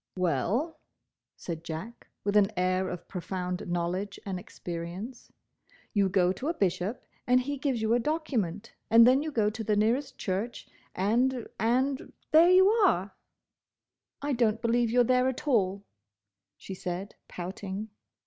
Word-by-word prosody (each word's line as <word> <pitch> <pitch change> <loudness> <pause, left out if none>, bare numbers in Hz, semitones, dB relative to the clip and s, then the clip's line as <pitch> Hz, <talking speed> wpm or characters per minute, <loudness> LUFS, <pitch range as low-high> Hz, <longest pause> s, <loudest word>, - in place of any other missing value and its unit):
"Well," 200 - 0 0.6
said 165 -2 -6
Jack, 170 +9 -7 0.2
with 205 +1 -1
an 205 0 +5
air 185 +1 +1
of 175 -1 -7
profound 180 +1 -4
knowledge 175 +3 -2
and 190 -2 -3
experience, 180 +8 -7 0.6
"You 200 -3 +3
go 180 -1 +3
to 255 +9 -5
a 335 - 0
Bishop, 195 - -1 0.2
and 250 0 +5
he 285 +2 -4
gives 260 -6 -1
you 220 +1 +2
a 240 - +4
document, 235 - -2 0.2
and 230 +1 +8
then 255 +3 +5
you 310 0 -3
go 215 -6 +1
to 220 +1 -5
the 215 0 +1
nearest 245 +7 +1
church—and—and—there 245 - 0
you 375 +1 +7
are!" 380 - +3 1.1
"I 290 0 0
don't 230 -3 +2
believe 235 0 +1
you're 245 +2 +4
there 250 +1 +3
at 260 +3 -4
all," 200 -6 +2 0.7
she 195 - -8
said, 185 +2 -5
pouting. 190 +3 -6
215 Hz, 140 wpm, -29 LUFS, 185-255 Hz, 1.1 s, and